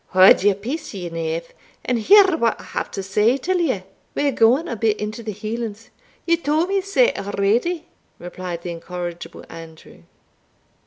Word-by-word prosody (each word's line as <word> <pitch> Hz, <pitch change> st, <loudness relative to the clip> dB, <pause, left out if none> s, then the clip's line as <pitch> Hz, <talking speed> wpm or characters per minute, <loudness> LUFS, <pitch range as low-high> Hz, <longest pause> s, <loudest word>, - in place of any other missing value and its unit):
"Haud 185 Hz, +1 st, +7 dB
your 200 Hz, 0 st, +3 dB
peace, 250 Hz, +6 st, -6 dB
ye 180 Hz, -3 st, -5 dB
knave, 165 Hz, 0 st, -4 dB, 0.3 s
and 245 Hz, -2 st, 0 dB
hear 385 Hz, -, +6 dB
what 235 Hz, -7 st, 0 dB
I -, -, -11 dB
have -, -, -4 dB
to 195 Hz, -, -5 dB
say 210 Hz, +6 st, +2 dB
till 360 Hz, +7 st, -1 dB
ye 260 Hz, -, 0 dB, 0.3 s
We 285 Hz, -, +1 dB
are -, -, 0 dB
gaun 255 Hz, +7 st, +3 dB
a 235 Hz, -, -3 dB
bit 220 Hz, -1 st, 0 dB
into 215 Hz, +2 st, -4 dB
the 220 Hz, -1 st, -5 dB
Hielands" 220 Hz, +2 st, -6 dB, 0.3 s
"Ye 335 Hz, 0 st, +3 dB
tauld 320 Hz, +2 st, 0 dB
me 395 Hz, 0 st, +1 dB
sae 395 Hz, +6 st, +2 dB
already," 210 Hz, -, 0 dB, 0.3 s
replied 175 Hz, -1 st, -7 dB
the 175 Hz, -, -4 dB
incorrigible 175 Hz, 0 st, -7 dB
Andrew. 160 Hz, -, -12 dB
215 Hz, 170 wpm, -21 LUFS, 185-295 Hz, 0.3 s, Haud